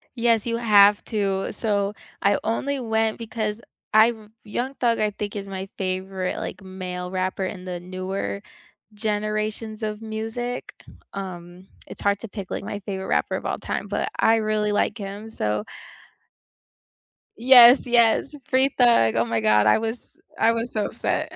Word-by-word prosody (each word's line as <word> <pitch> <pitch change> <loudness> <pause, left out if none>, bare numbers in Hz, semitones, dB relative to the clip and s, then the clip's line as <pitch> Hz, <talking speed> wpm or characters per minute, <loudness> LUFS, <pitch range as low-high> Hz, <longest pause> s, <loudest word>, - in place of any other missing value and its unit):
Yes, 230 -2 +2
you 230 - 0
have 205 -3 +5
to. 195 -3 -1
So 205 -2 -1 0.3
I 200 0 +3
only 275 +5 -1
went 220 -2 0
because 220 -1 -3 0.3
I've 220 -1 +4 0.2
Young 245 +6 -3
Thug, 235 -3 +1
I 215 0 +2
think, 205 0 -5
is 200 -1 -5
my 190 0 -5
favorite, 185 0 -3
like, - - -6
male 180 -1 -6
rapper 185 +1 -2
in 185 -1 -6
the 180 -1 -4
newer 185 +2 -4 0.5
generations 215 +1 -2
of 215 +1 -4
music. 225 +3 -4 0.4
Um, 180 -1 -8 0.2
it's - - -10
hard 200 0 +1
to 230 - -7
pick, 200 -2 -8
like, - - -4
my 205 0 -5
favorite 190 -1 -5
rapper - - 0
of - - -6
all - - -2
time, - - -4
but - - -1
I 225 - +4
really 215 -1 0
like 205 - 0
him, 200 +2 -7
so 105 - -2 1.7
Yes, 245 +1 +8
yes, 240 +2 +3
Free 265 +1 +3
Thug, 235 - +5
oh 115 - +2
my 115 -1 -1
God, 105 -1 +4
I 105 - +6
was 225 +1 -5 0.2
I 230 - +4
was 230 +1 -2
so 215 -2 -1
upset. - - -2
210 Hz, 160 wpm, -24 LUFS, 190-225 Hz, 1.7 s, Yes